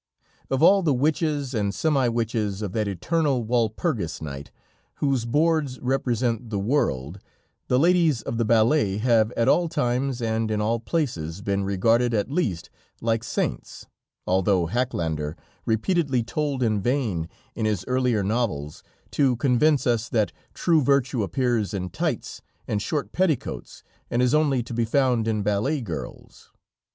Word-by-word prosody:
Of 135 Hz, +3 st, +1 dB
all 195 Hz, +3 st, +6 dB
the 155 Hz, -6 st, +2 dB
witches 145 Hz, 0 st, 0 dB
and 105 Hz, -3 st, -1 dB
semi 140 Hz, -5 st, +2 dB
witches 110 Hz, -3 st, -1 dB
of 100 Hz, -, -3 dB
that 105 Hz, +1 st, -1 dB
eternal 135 Hz, -, 0 dB
Walpurgis 115 Hz, -, -1 dB
night, 70 Hz, -2 st, -7 dB, 0.5 s
whose 135 Hz, -5 st, 0 dB
boards 150 Hz, 0 st, +1 dB
represent 125 Hz, -3 st, -1 dB
the 105 Hz, -, -2 dB
world, 100 Hz, -, -1 dB, 0.5 s
the 125 Hz, -, +2 dB
ladies 165 Hz, -4 st, +3 dB
of 115 Hz, -, -3 dB
the -, -, +3 dB
ballet 110 Hz, -1 st, +3 dB
have 115 Hz, -1 st, +3 dB
at 115 Hz, -, 0 dB
all 175 Hz, -1 st, +3 dB
times 130 Hz, -3 st, -1 dB
and 110 Hz, -1 st, -1 dB
in 105 Hz, -1 st, 0 dB
all 115 Hz, +2 st, 0 dB
places 100 Hz, -, -3 dB
been 100 Hz, 0 st, 0 dB
regarded 115 Hz, +5 st, +2 dB
at 105 Hz, +5 st, -1 dB
least 110 Hz, -, -2 dB, 0.3 s
like 115 Hz, 0 st, 0 dB
saints, -, -, -3 dB, 0.4 s
although 95 Hz, -1 st, +2 dB
Hackländer 80 Hz, -8 st, -2 dB, 0.3 s
repeatedly 130 Hz, -, +1 dB
told 140 Hz, +1 st, -2 dB
in 110 Hz, -3 st, +1 dB
vain 110 Hz, -, -1 dB, 0.2 s
in 110 Hz, -2 st, -1 dB
his 100 Hz, -4 st, -1 dB
earlier 125 Hz, -5 st, +1 dB
novels, 95 Hz, -10 st, -2 dB, 0.3 s
to 135 Hz, -3 st, +2 dB
convince 140 Hz, +4 st, +2 dB
us 120 Hz, -2 st, +1 dB
that 110 Hz, -4 st, +1 dB, 0.2 s
true 165 Hz, -3 st, +3 dB
virtue 130 Hz, -3 st, +2 dB
appears 110 Hz, +1 st, 0 dB
in 90 Hz, -2 st, -4 dB
tights -, -, -3 dB, 0.3 s
and 105 Hz, -, -1 dB
short 145 Hz, +6 st, -2 dB
petticoats 175 Hz, -8 st, -2 dB, 0.3 s
and 120 Hz, +1 st, +1 dB
is 125 Hz, -, +2 dB
only 145 Hz, -5 st, +2 dB
to 120 Hz, -, -8 dB
be 115 Hz, 0 st, +1 dB
found 120 Hz, -1 st, +1 dB
in 110 Hz, -2 st, 0 dB
ballet 105 Hz, +9 st, 0 dB
girls. 100 Hz, -11 st, -8 dB
120 Hz, 150 wpm, -24 LUFS, 105-135 Hz, 0.5 s, all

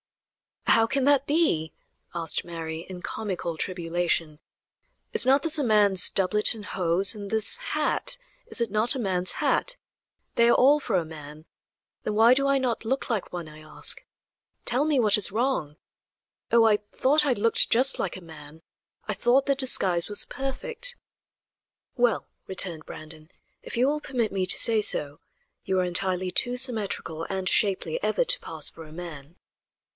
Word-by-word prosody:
"How 225 Hz, 0 st, +4 dB
can 270 Hz, +3 st, -1 dB
that 280 Hz, 0 st, +3 dB
be?" 285 Hz, -, +1 dB, 0.4 s
asked 165 Hz, -1 st, -1 dB
Mary, 165 Hz, -1 st, -7 dB
in 180 Hz, -1 st, -9 dB
comical 185 Hz, -6 st, -4 dB
tribulation; 170 Hz, -3 st, -2 dB, 0.7 s
"is -, -, +5 dB
not 275 Hz, +2 st, +4 dB
this 320 Hz, -2 st, +1 dB
a -, -, 0 dB
man's 205 Hz, -5 st, +5 dB
doublet 210 Hz, +4 st, +2 dB
and 210 Hz, -2 st, -10 dB
hose, 185 Hz, +2 st, +2 dB
and 205 Hz, -2 st, -8 dB
this 220 Hz, -, +5 dB
hat -, -, -2 dB, 0.3 s
is -, -, -4 dB
it 230 Hz, -4 st, -1 dB
not 220 Hz, +5 st, +2 dB
a -, -, -3 dB
man's 185 Hz, -4 st, 0 dB
hat? -, -, -1 dB, 0.6 s
They 235 Hz, 0 st, +4 dB
are -, -, +5 dB
all 285 Hz, +4 st, +5 dB
for 235 Hz, -8 st, -3 dB
a 175 Hz, -3 st, 0 dB
man; 155 Hz, 0 st, -11 dB, 0.6 s
then 210 Hz, -, -3 dB
why 225 Hz, +3 st, +6 dB
do 275 Hz, +2 st, +1 dB
I 275 Hz, 0 st, +3 dB
not 250 Hz, -4 st, -2 dB
look 260 Hz, +2 st, -2 dB
like 215 Hz, -5 st, -3 dB
one, 175 Hz, -2 st, -6 dB
I 155 Hz, 0 st, -13 dB
ask? 155 Hz, 0 st, -1 dB, 0.6 s
Tell 255 Hz, +5 st, +2 dB
me 300 Hz, -4 st, +1 dB
what 215 Hz, -2 st, +3 dB
is 205 Hz, -, +3 dB
wrong. 220 Hz, -, -1 dB, 0.8 s
Oh! 235 Hz, -1 st, +5 dB
I 220 Hz, -2 st, +4 dB
thought 265 Hz, +8 st, +1 dB
I 275 Hz, -, +2 dB
looked 230 Hz, 0 st, +2 dB
just 260 Hz, +4 st, +3 dB
like 185 Hz, -, -3 dB
a -, -, -11 dB
man; 160 Hz, -1 st, -13 dB, 0.4 s
I 210 Hz, -, -1 dB
thought 240 Hz, +7 st, +2 dB
the 280 Hz, -, +2 dB
disguise 195 Hz, -10 st, 0 dB
was 205 Hz, -, +2 dB
perfect." 475 Hz, -, -3 dB, 1.0 s
"Well," 240 Hz, -5 st, +1 dB, 0.2 s
returned 180 Hz, -4 st, -4 dB
Brandon, 155 Hz, 0 st, -11 dB, 0.3 s
"if -, -, -8 dB
you 245 Hz, -, +3 dB
will 300 Hz, +1 st, -1 dB
permit 245 Hz, -6 st, -2 dB
me 190 Hz, -1 st, -2 dB
to -, -, +2 dB
say 225 Hz, -2 st, +2 dB
so, 145 Hz, -7 st, 0 dB, 0.4 s
you 190 Hz, -1 st, 0 dB
are -, -, +2 dB
entirely 185 Hz, 0 st, -1 dB
too 245 Hz, +5 st, +1 dB
symmetrical 210 Hz, -10 st, 0 dB
and 190 Hz, -1 st, -3 dB
shapely 205 Hz, -, +1 dB
ever -, -, +1 dB
to -, -, +1 dB
pass -, -, -4 dB
for 165 Hz, -, -4 dB
a 155 Hz, -, -15 dB
man." 160 Hz, -3 st, -10 dB
210 Hz, 170 wpm, -25 LUFS, 175-255 Hz, 1.0 s, why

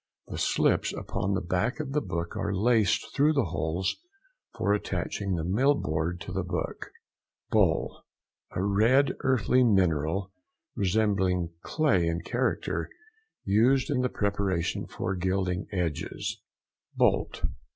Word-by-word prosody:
The -, -, -5 dB
slips -, -, +2 dB
upon 100 Hz, +1 st, -2 dB
the 95 Hz, -, -1 dB
back 95 Hz, -, -1 dB
of 145 Hz, -3 st, -4 dB
the 150 Hz, +2 st, +1 dB
book 85 Hz, -6 st, -4 dB
are 100 Hz, -1 st, -1 dB
laced 105 Hz, 0 st, +2 dB
through 150 Hz, +3 st, +4 dB
the 140 Hz, -6 st, +2 dB
holes 80 Hz, +5 st, -1 dB, 0.6 s
for 100 Hz, -, +2 dB
attaching 100 Hz, -1 st, -2 dB
the 80 Hz, -, -2 dB
mill 125 Hz, -, +3 dB
board 80 Hz, -, -2 dB
to -, -, -7 dB
the 95 Hz, +1 st, -1 dB
book. 90 Hz, 0 st, -4 dB, 0.6 s
BOLE.—A 90 Hz, -, -1 dB
red 115 Hz, +8 st, +3 dB
earthy 130 Hz, 0 st, +3 dB
mineral, 95 Hz, -3 st, +2 dB, 0.4 s
resembling 95 Hz, -3 st, +1 dB
clay 105 Hz, -, +1 dB
in 85 Hz, +1 st, -1 dB
character, 125 Hz, +6 st, -1 dB, 0.5 s
used 125 Hz, +8 st, +3 dB
in 130 Hz, -3 st, +1 dB
the 125 Hz, -, +1 dB
preparation 100 Hz, -5 st, -1 dB
for 95 Hz, -, -3 dB
gilding 95 Hz, 0 st, -1 dB
edges. 85 Hz, -6 st, -3 dB, 0.5 s
BOLT. -, -, +1 dB
100 Hz, 125 wpm, -28 LUFS, 90-120 Hz, 0.6 s, through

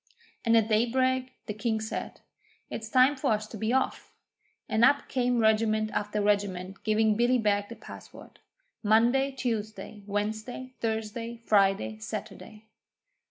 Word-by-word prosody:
And 230 Hz, -1 st, +4 dB
at 220 Hz, -1 st, +3 dB
daybreak 255 Hz, +3 st, +1 dB
the 210 Hz, -, -4 dB
King 220 Hz, +1 st, -1 dB
said: 220 Hz, 0 st, -5 dB, 0.5 s
'It's 220 Hz, 0 st, -5 dB
time 260 Hz, +3 st, +5 dB
for 265 Hz, -4 st, +1 dB
us 215 Hz, 0 st, -2 dB
to 215 Hz, -, -10 dB
be 220 Hz, +2 st, -1 dB
off,' 260 Hz, +1 st, -1 dB, 0.6 s
and 220 Hz, +1 st, +1 dB
up 285 Hz, +3 st, +4 dB
came 250 Hz, -2 st, 0 dB
regiment 215 Hz, -1 st, +2 dB
after 210 Hz, 0 st, -1 dB
regiment 195 Hz, -2 st, -1 dB
giving 215 Hz, 0 st, +2 dB
Billy 240 Hz, +3 st, +3 dB
Beg 205 Hz, -3 st, +1 dB
the 235 Hz, -, -7 dB
password 220 Hz, -, -13 dB, 0.4 s
Monday, 235 Hz, +6 st, +3 dB
Tuesday, 220 Hz, -4 st, -4 dB
Wednesday, 215 Hz, +5 st, -3 dB
Thursday, 225 Hz, +1 st, -3 dB
Friday, 210 Hz, -1 st, +2 dB
Saturday. 215 Hz, 0 st, -8 dB
220 Hz, 135 wpm, -28 LUFS, 210-240 Hz, 0.6 s, time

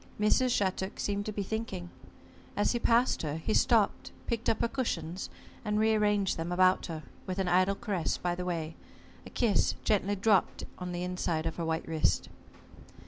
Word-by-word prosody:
Mrs. 235 Hz, +5 st, +3 dB
Shattuck 190 Hz, -4 st, -1 dB
seemed 205 Hz, 0 st, -1 dB
to -, -, -1 dB
be 205 Hz, -1 st, -3 dB
thinking. 195 Hz, -4 st, -4 dB, 0.7 s
As 205 Hz, -, +2 dB
he 240 Hz, -, 0 dB
passed 235 Hz, +2 st, +3 dB
her, 150 Hz, -2 st, -2 dB
he 190 Hz, +7 st, -2 dB
stopped, 220 Hz, -3 st, +2 dB
picked 230 Hz, 0 st, -1 dB
up 220 Hz, -, +1 dB
her -, -, +2 dB
cushions, 185 Hz, -9 st, -3 dB, 0.3 s
and 210 Hz, -1 st, 0 dB
re 220 Hz, 0 st, +4 dB
arranged 205 Hz, -2 st, +2 dB
them 165 Hz, +2 st, -3 dB
about 185 Hz, +1 st, +3 dB
her, 160 Hz, -2 st, -6 dB, 0.2 s
with 185 Hz, 0 st, -3 dB
an 190 Hz, -1 st, 0 dB
idle 185 Hz, +2 st, +3 dB
caress 195 Hz, -8 st, -2 dB
by 175 Hz, -1 st, -1 dB
the 180 Hz, +1 st, -4 dB
way, 165 Hz, -3 st, -3 dB, 0.5 s
a -, -, -9 dB
kiss 225 Hz, -5 st, +2 dB
gently 205 Hz, -1 st, +1 dB
dropped 200 Hz, -1 st, +2 dB, 0.2 s
on 180 Hz, -1 st, -4 dB
the 175 Hz, 0 st, -3 dB
inside 175 Hz, -3 st, -1 dB
of 165 Hz, -, -3 dB
her 170 Hz, -, -2 dB
white 160 Hz, 0 st, -2 dB
wrist. 155 Hz, -, +1 dB
190 Hz, 185 wpm, -30 LUFS, 175-215 Hz, 0.7 s, re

